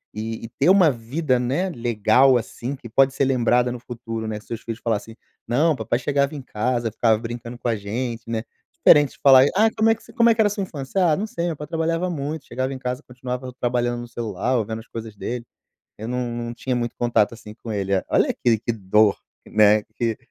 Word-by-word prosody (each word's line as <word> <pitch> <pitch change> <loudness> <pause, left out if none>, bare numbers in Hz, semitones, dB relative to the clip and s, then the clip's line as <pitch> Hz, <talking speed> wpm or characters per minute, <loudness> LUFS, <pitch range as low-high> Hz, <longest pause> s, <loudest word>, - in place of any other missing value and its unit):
e 110 +1 -5
ter 150 +6 +4
uma 185 -5 +6
vida, 130 +3 -1
né, 140 +10 -1
legal, 120 +1 +3
assim, 120 +3 -5
que 120 - -11
pode 135 +3 +3
ser 140 - +2
lembrada 125 -1 +2
no 125 - -5
futuro, 115 -2 -6
né. 110 -1 -4
Seus 110 +1 -7
filhos 115 0 -6
falar 115 -3 +1
assim: 115 +2 -11 0.3
"Não, 150 +7 +2
papai 120 - -1
chegava 140 +3 0
em 140 - -6
casa, 120 -1 -2
ficava 110 0 +2
brincando 120 +1 -7
com 125 - -4
a 115 - +1
gente". 115 +3 -4
Né? 110 -1 -2 0.3
Diferente 145 -2 +5
de - - -21
falar: 135 -1 +8
"Ai, 220 +1 +4
como 220 0 +2
é 225 - +4
que - - -20
você - - -16
como 235 -2 +4
é 225 - +4
que - - -19
era 215 - +4
a - - 0
sua 205 0 -3
infância?". 160 +2 -2
"Ah, - - +3
não 205 - -2
sei, 175 -5 -4
o - - 0
meu 165 - -2
pai 150 - -6
trabalhava 165 +3 -1
muito, 150 0 -4
chegava 130 +2 -3
em 135 - -5
casa, 125 -1 -4
continuava 125 +1 -5
trabalhando 120 0 0
no 120 - -8
celular, 115 +1 -2
ou 115 - +1
vendo 110 +1 -5
as 115 - -19
coisas 110 -2 -8
dele, 120 +3 -5 0.5
eu 110 +2 -7
não 125 -1 -2
não 120 0 -4
tinha 130 +1 -2
muito 120 -1 -2
contato, 115 -2 +2
assim 105 -2 -11
com 115 0 -8
ele". 100 -2 -2 0.2
Olha, - - +2
que 115 -2 +2
que 120 +2 -2
dor, 105 0 +3 0.3
né, 105 0 +4
que 115 -2 -1
120 Hz, 235 wpm, -23 LUFS, 115-140 Hz, 0.5 s, falar